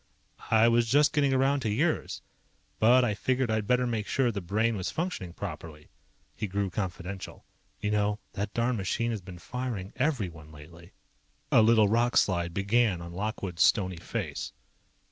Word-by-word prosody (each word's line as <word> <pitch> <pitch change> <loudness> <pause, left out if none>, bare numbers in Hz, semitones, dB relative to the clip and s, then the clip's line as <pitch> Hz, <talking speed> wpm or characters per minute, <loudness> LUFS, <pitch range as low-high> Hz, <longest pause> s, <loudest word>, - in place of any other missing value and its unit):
"I 110 +1 +5
was 115 0 +3
just 145 +4 +4
getting 145 -2 +2
around 135 +2 +2
to 120 -5 -2
yours. 105 - -1 0.6
But 125 +3 +5
I 105 - 0
figured 130 +3 0
I'd 110 -2 -1
better 125 0 +3
make 115 -3 -2
sure 130 -3 +1
the 100 -2 -4
Brain 110 +6 0
was 95 -2 -3
functioning 160 - -3
properly." 80 -3 -8 0.4
He 105 - -3
grew 100 0 -2
confidential. 95 0 -5 0.3
"You 105 0 -2
know, 105 0 +1
that 100 +1 -3
darned 120 +1 +1
machine 115 +5 -1
has 110 -3 -4
been 90 -1 -10
firing 115 -1 -5
everyone 95 - -2
lately." 80 +4 -14 0.6
A - - +6
little 110 -1 +5
rockslide 100 -6 +2
began 100 +1 +1
on 85 0 -8
Lockwood's 95 -3 -4
stoney 95 -2 +3
face. 85 - -5
105 Hz, 160 wpm, -28 LUFS, 95-120 Hz, 0.6 s, A